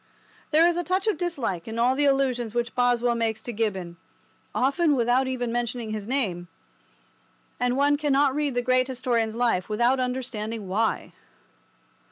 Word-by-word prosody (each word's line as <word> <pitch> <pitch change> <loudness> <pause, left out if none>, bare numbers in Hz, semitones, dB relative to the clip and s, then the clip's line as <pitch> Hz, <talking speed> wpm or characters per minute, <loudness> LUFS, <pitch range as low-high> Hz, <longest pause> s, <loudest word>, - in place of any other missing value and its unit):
There 325 +2 +5
is 345 0 +1
a 350 - 0
touch 370 +2 -1
of 435 - +2
dislike 270 - -3
in 225 0 -5
all 240 +2 +3
the 290 +2 +1
allusions 255 -5 +1
which 235 -1 -1
Boswell 245 -1 +2
makes 225 -2 -1
to 240 - -5
Gibbon—often 225 - -2
without 245 +2 +2
even 245 -2 -2
mentioning 240 -1 -2
his 215 -1 -5
name—and 245 +3 -5
one 290 +1 +3
cannot 285 -2 +2
read 290 -2 -1
the 245 - 0
great 255 +1 +2
historian's 240 -4 -1
life 230 -6 0
without 240 +5 +2
understanding 230 -4 -3
why. 215 +4 -1
245 Hz, 150 wpm, -25 LUFS, 225-270 Hz, -, There